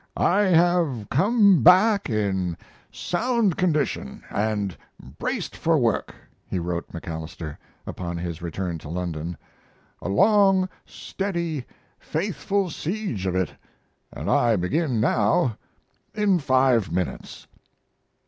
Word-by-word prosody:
"I 190 Hz, -, +3 dB
have 170 Hz, -, +2 dB
come 200 Hz, -, +4 dB
back 195 Hz, +3 st, +5 dB
in 95 Hz, -6 st, -1 dB, 0.3 s
sound 225 Hz, -1 st, 0 dB
condition 155 Hz, -, -1 dB
and 105 Hz, -2 st, -1 dB, 0.4 s
braced -, -, -3 dB
for 165 Hz, 0 st, +2 dB
work," 115 Hz, -5 st, 0 dB, 0.3 s
he -, -, -2 dB
wrote 85 Hz, 0 st, -3 dB
MacAlister, 80 Hz, -2 st, -6 dB, 0.3 s
upon 85 Hz, -1 st, -5 dB
his 85 Hz, -1 st, -5 dB
return 85 Hz, 0 st, -4 dB
to 75 Hz, -, -10 dB
London. 85 Hz, -1 st, -4 dB, 0.6 s
"A -, -, -4 dB
long, 195 Hz, -, +4 dB, 0.2 s
steady, 170 Hz, -8 st, -4 dB, 0.3 s
faithful 195 Hz, +2 st, -2 dB
siege 155 Hz, -, -3 dB
of 90 Hz, -, -1 dB
it, 95 Hz, -3 st, 0 dB, 0.6 s
and -, -, -7 dB
I 120 Hz, -2 st, +3 dB
begin 120 Hz, -, 0 dB
now 110 Hz, +1 st, +2 dB, 0.6 s
in 205 Hz, -4 st, +2 dB
five 130 Hz, -, +2 dB
minutes." 90 Hz, 0 st, -4 dB
125 Hz, 110 wpm, -24 LUFS, -, 0.6 s, back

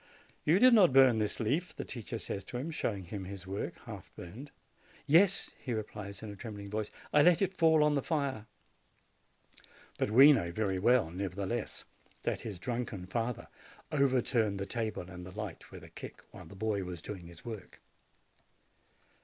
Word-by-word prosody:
"You 160 Hz, +4 st, +5 dB
did 250 Hz, +4 st, +7 dB
not 190 Hz, -, +6 dB
burn 130 Hz, -4 st, +7 dB
this 105 Hz, -1 st, -1 dB
leaf," 145 Hz, +11 st, -1 dB
the -, -, -5 dB
teacher 115 Hz, -1 st, -6 dB
says 100 Hz, -3 st, -5 dB
to 120 Hz, -, -5 dB
him, 145 Hz, +7 st, -3 dB
showing 105 Hz, -10 st, -2 dB
him 95 Hz, +2 st, -6 dB
his 95 Hz, 0 st, -8 dB
work, 95 Hz, +2 st, -4 dB
half -, -, -9 dB
burned. 115 Hz, +12 st, -9 dB, 0.6 s
"Yes," 180 Hz, +6 st, +4 dB
he 125 Hz, -4 st, -3 dB
replies, 105 Hz, -2 st, -6 dB
in 110 Hz, -, -6 dB
a -, -, -8 dB
trembling 100 Hz, -1 st, -8 dB
voice; 105 Hz, 0 st, -2 dB, 0.2 s
"I 150 Hz, -, +7 dB
let 175 Hz, +2 st, +6 dB
it 190 Hz, -1 st, 0 dB
fall 160 Hz, -3 st, +5 dB
on 150 Hz, 0 st, +3 dB
the 140 Hz, -, +1 dB
fire." 140 Hz, -9 st, -2 dB, 1.5 s
But -, -, +1 dB
we 135 Hz, +7 st, +9 dB
know 85 Hz, -10 st, 0 dB
very 95 Hz, 0 st, -1 dB
well, 115 Hz, -4 st, +3 dB
nevertheless, 100 Hz, +5 st, -3 dB, 0.4 s
that -, -, -1 dB
his 105 Hz, -5 st, -6 dB
drunken 115 Hz, -3 st, -4 dB
father 115 Hz, +4 st, -3 dB, 0.4 s
overturned 125 Hz, -7 st, +2 dB
the 95 Hz, -, -2 dB
table 110 Hz, 0 st, -3 dB
and 90 Hz, -1 st, -9 dB
the 90 Hz, +3 st, -10 dB
light 105 Hz, -5 st, -6 dB
with -, -, -11 dB
a -, -, -12 dB
kick, -, -, -10 dB
while -, -, -11 dB
the 100 Hz, -, -12 dB
boy 105 Hz, -1 st, -1 dB
was 90 Hz, -2 st, -7 dB
doing 95 Hz, -5 st, -7 dB
his 85 Hz, -1 st, -13 dB
work. 110 Hz, -6 st, -8 dB
110 Hz, 180 wpm, -32 LUFS, 100-135 Hz, 1.5 s, we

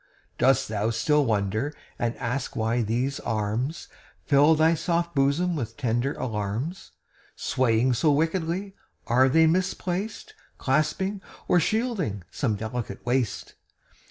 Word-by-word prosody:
Dost 135 Hz, -1 st, +3 dB
thou 105 Hz, 0 st, -1 dB
still 145 Hz, +6 st, +2 dB
wonder, 110 Hz, +6 st, 0 dB, 0.2 s
and 120 Hz, 0 st, -1 dB
ask 120 Hz, +2 st, -3 dB
why 115 Hz, +2 st, +1 dB
these 120 Hz, +5 st, -1 dB
arms 115 Hz, +7 st, -2 dB, 0.4 s
Fill 145 Hz, +2 st, +5 dB
thy 160 Hz, +1 st, +4 dB
soft 170 Hz, +1 st, -1 dB
bosom 145 Hz, +6 st, +2 dB
with 115 Hz, -6 st, -4 dB
tender 125 Hz, 0 st, 0 dB
alarms, 115 Hz, -, -4 dB, 0.4 s
Swaying 125 Hz, 0 st, +1 dB
so 145 Hz, +6 st, +3 dB
wickedly? 165 Hz, +5 st, 0 dB, 0.3 s
Are 130 Hz, +3 st, +4 dB
they 160 Hz, +4 st, +5 dB
misplaced 185 Hz, +4 st, -1 dB, 0.2 s
Clasping 155 Hz, +8 st, 0 dB, 0.3 s
or 175 Hz, -, +4 dB
shielding 190 Hz, -, -1 dB
some 110 Hz, -3 st, -1 dB
delicate 110 Hz, -1 st, -5 dB
waist? 120 Hz, -4 st, -1 dB
135 Hz, 120 wpm, -26 LUFS, 115-165 Hz, 0.4 s, Fill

